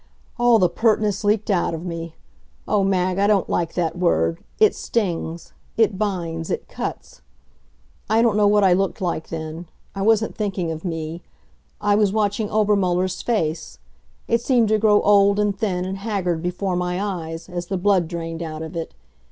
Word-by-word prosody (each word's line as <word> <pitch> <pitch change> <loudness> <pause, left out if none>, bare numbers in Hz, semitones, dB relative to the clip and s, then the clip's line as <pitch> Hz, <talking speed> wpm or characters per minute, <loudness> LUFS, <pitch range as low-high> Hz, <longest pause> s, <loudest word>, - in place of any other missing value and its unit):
All 240 -1 +5
the 185 -4 +4
pertness 210 +2 +1
leaked 210 +1 +1
out 175 -3 +1
of 165 +2 -7
me. 165 -2 -6 0.5
Oh, 210 -2 +2
Mag, 185 -1 +1
I 200 - +3
don't 205 -3 +2
like 170 -2 -1
that 165 -2 -1
word. 85 - +1 0.2
It 430 -1 +5
stings 170 -6 -3 0.2
it 210 -4 +2
binds 170 -6 -2
it - - -3
cuts. - - -6 0.9
I 225 +2 +4
don't 230 -3 +3
know 210 -1 +4
what 205 0 +4
I 185 -2 +5
looked 195 +1 0
like 170 -3 -2
then; 160 +1 -6 0.3
I 195 - -5
wasn't 220 +1 +2
thinking 195 -5 -2
of 160 0 -6
me. 165 -1 -4 0.6
I 205 0 +2
was 205 -1 +3
watching 210 0 0
Obermuller's 185 -4 +1
face. 160 - -2 0.5
It 230 0 +1
seemed 240 -3 +2
to 215 0 +3
grow 210 -1 +4
old 200 0 +5
and 205 -1 +1
thin 190 -3 -1
and 190 +1 -4
haggard 190 -6 -2
before 180 +2 -2
my 180 0 -1
eyes, 170 -5 -4
as 175 -1 -5
the 195 - -2
blood 185 -2 +2
drained 165 -1 -5
out 160 -1 -5
of 160 +2 -8
it. 165 -1 -5
190 Hz, 175 wpm, -22 LUFS, 170-210 Hz, 0.9 s, All